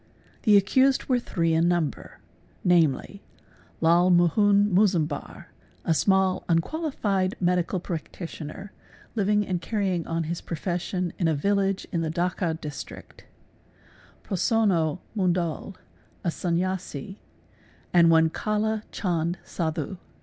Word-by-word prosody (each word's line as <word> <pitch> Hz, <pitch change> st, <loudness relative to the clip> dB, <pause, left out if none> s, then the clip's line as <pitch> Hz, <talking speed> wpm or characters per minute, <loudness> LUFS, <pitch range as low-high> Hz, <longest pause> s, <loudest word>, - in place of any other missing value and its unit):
Thi 210 Hz, -2 st, +6 dB
accused 260 Hz, +7 st, +3 dB
were 255 Hz, -2 st, +2 dB
three 165 Hz, -8 st, 0 dB
in 165 Hz, +1 st, +3 dB
number 170 Hz, -5 st, -1 dB, 0.5 s
namely 175 Hz, +2 st, +2 dB, 0.6 s
Lal 170 Hz, +2 st, +4 dB
Mohun 200 Hz, +3 st, +4 dB
Mozumdar, 180 Hz, -7 st, 0 dB, 0.3 s
a -, -, +1 dB
smal 190 Hz, +2 st, +2 dB
unqualified 195 Hz, -, 0 dB
medical 180 Hz, 0 st, +1 dB
practitioner, 170 Hz, +1 st, -7 dB, 0.4 s
living 210 Hz, -1 st, +1 dB
and 180 Hz, -3 st, -2 dB
carrying 190 Hz, -6 st, -1 dB
on 165 Hz, 0 st, -1 dB
his 165 Hz, +2 st, -4 dB
professioi 180 Hz, +1 st, -3 dB
in 170 Hz, -, +2 dB
a 160 Hz, -, +2 dB
village 195 Hz, +4 st, 0 dB
in 170 Hz, -, 0 dB
the 160 Hz, -, -1 dB
Dacca 175 Hz, 0 st, -1 dB
district, 150 Hz, -3 st, -9 dB, 1.0 s
Prosonno 185 Hz, -5 st, +1 dB
Mundul, 180 Hz, -1 st, -1 dB, 0.5 s
a 175 Hz, -, +1 dB
Sanyasi, 180 Hz, 0 st, -3 dB, 0.8 s
at 175 Hz, -1 st, +6 dB
one 160 Hz, -1 st, +5 dB
Kalla 215 Hz, +2 st, -1 dB
Chand 175 Hz, -2 st, -1 dB
Sadhu. 165 Hz, +3 st, -3 dB
180 Hz, 110 wpm, -26 LUFS, 165-200 Hz, 1.0 s, Thi